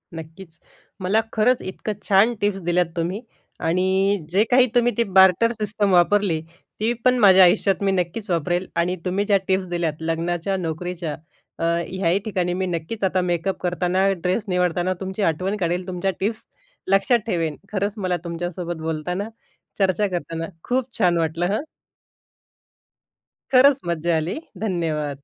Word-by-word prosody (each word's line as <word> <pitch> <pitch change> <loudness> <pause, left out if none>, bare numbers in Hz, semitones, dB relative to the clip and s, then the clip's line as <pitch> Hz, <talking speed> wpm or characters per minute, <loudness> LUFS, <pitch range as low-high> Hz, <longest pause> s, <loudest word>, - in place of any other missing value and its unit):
नक्कीच 165 +2 -11 0.4
मला 200 +5 +2
खरंच 240 +3 +2
इतकं 190 +3 -5
छान 205 +4 +4
टिप्स 205 -1 0
दिल्यात 175 +1 +2
तुम्ही 180 +6 -2 0.5
आणि 190 +1 +1
जे 195 +5 +3
काही 250 0 +6
तुम्ही 245 0 +4
ती 235 - +3
बार्टर 190 +3 +5
सिस्टम 210 -2 -1
वापरली. 180 -2 +3 0.4
ती 220 +2 +1
पण 255 0 +5
माझ्या 190 -3 +7
आयुष्यात 190 +2 +4
मी 195 - +2
नक्कीच 190 +3 -2
वापरेल 175 +2 0
आणि 175 +2 +1
तुम्ही 195 +3 0
ज्या 200 -1 +4
टिप्स 190 0 +1
दिल्यात 170 -3 -2
लग्नाच्या, 170 +3 -1
नोकरीच्या 170 -1 -4 0.4
अ, - - -3 0.3
ह्याही 185 0 +1
ठिकाणी 180 -4 -1
मी 185 +1 -1
नक्कीच 175 +5 -4
आता 185 -1 +2
मेकअप 180 +2 -1
करताना, 180 +2 +1
ड्रेस 180 +4 -1
निवडताना 180 0 +1
तुमची 190 +2 -4
आठवण 185 +6 -2
काढेल. 180 0 -1
तुमच्या 185 +1 -1
टिप्स 215 +3 -2 0.5
लक्षात 195 +5 +3
ठेवेन. 165 -7 -1 0.2
खरंच 200 0 -1
मला 185 -3 -1
तुमच्यासोबत 175 0 -5
बोलताना, 170 +6 -3 0.5
चर्चा 195 +1 +2
करताना, 165 -2 -4 0.2
खूप 255 0 0
छान 180 -5 +3
वाटलं, 165 +1 0
हं. 275 - -2 1.9
खरंच 270 +2 +6
मज्जा 170 0 0
आली. 160 - -2 0.3
धन्यवाद. 150 -7 -2
185 Hz, 145 wpm, -22 LUFS, 170-200 Hz, 1.9 s, माझ्या